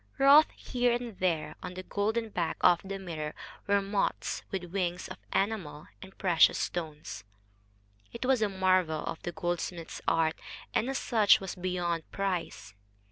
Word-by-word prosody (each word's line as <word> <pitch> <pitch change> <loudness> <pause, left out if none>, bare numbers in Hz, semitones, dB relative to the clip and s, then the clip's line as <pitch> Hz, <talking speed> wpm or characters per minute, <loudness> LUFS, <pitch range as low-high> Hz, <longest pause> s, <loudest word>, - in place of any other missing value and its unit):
Wrought 280 +3 +8
here 245 -1 0
and 240 -4 -4
there, 160 -4 0
on 180 - -7
the 185 - -6
golden 220 +4 -1
back 175 -5 -2
of 175 -1 +5
the 195 0 -5
mirror, 160 -5 -5 0.3
were 200 0 +3
moths 200 0 -1
with 190 -2 -3
wings 180 -2 -2
of - - -9
enamel 195 -7 -2
and 190 0 -12
precious 175 -4 +4
stones. 155 -8 -4 0.9
It 235 - -5
was 260 -3 +3
a 215 - +2
marvel 185 -5 +1
of 160 - -5
the 175 - -4
goldsmith's 175 -1 -4
art, 160 -1 +3 0.4
and 235 - +1
as 270 - -1
such 220 -4 +4
was 190 -2 -5
beyond 175 -3 -2
price. 190 - -3
185 Hz, 155 wpm, -30 LUFS, 170-205 Hz, 0.9 s, Wrought